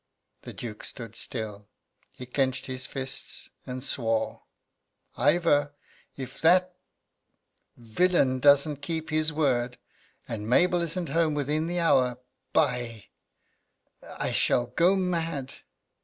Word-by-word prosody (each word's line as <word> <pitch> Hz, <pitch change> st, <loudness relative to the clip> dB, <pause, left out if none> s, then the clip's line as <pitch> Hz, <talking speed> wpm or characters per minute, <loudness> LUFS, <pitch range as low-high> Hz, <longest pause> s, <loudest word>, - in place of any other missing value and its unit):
The -, -, -9 dB
Duke 110 Hz, -3 st, -7 dB
stood 115 Hz, -4 st, -7 dB
still. 105 Hz, -4 st, -5 dB, 0.4 s
He 125 Hz, -, -10 dB
clenched 130 Hz, 0 st, -1 dB
his 130 Hz, 0 st, -4 dB
fists, 135 Hz, -1 st, -1 dB, 0.2 s
and 125 Hz, 0 st, -5 dB
swore: 115 Hz, -5 st, 0 dB, 0.7 s
"Ivor, 145 Hz, 0 st, +2 dB, 0.4 s
if 130 Hz, -2 st, -8 dB
that 180 Hz, +2 st, +4 dB, 1.0 s
villain 130 Hz, +2 st, +1 dB
doesn't 145 Hz, +1 st, +5 dB
keep 160 Hz, +1 st, -4 dB
his 155 Hz, 0 st, +2 dB
word, 125 Hz, -5 st, 0 dB, 0.5 s
and 110 Hz, -1 st, -5 dB
Mabel 175 Hz, +7 st, +3 dB
isn't 170 Hz, 0 st, +1 dB
home 160 Hz, 0 st, +1 dB
within 150 Hz, +3 st, -1 dB
the 175 Hz, +1 st, -2 dB
hour, 125 Hz, -7 st, +3 dB, 0.3 s
by 120 Hz, -7 st, -1 dB, 1.1 s
I -, -, -1 dB
shall 120 Hz, -, +2 dB
go 170 Hz, +10 st, +2 dB
mad!" 165 Hz, -7 st, -2 dB
140 Hz, 110 wpm, -27 LUFS, 125-165 Hz, 1.1 s, doesn't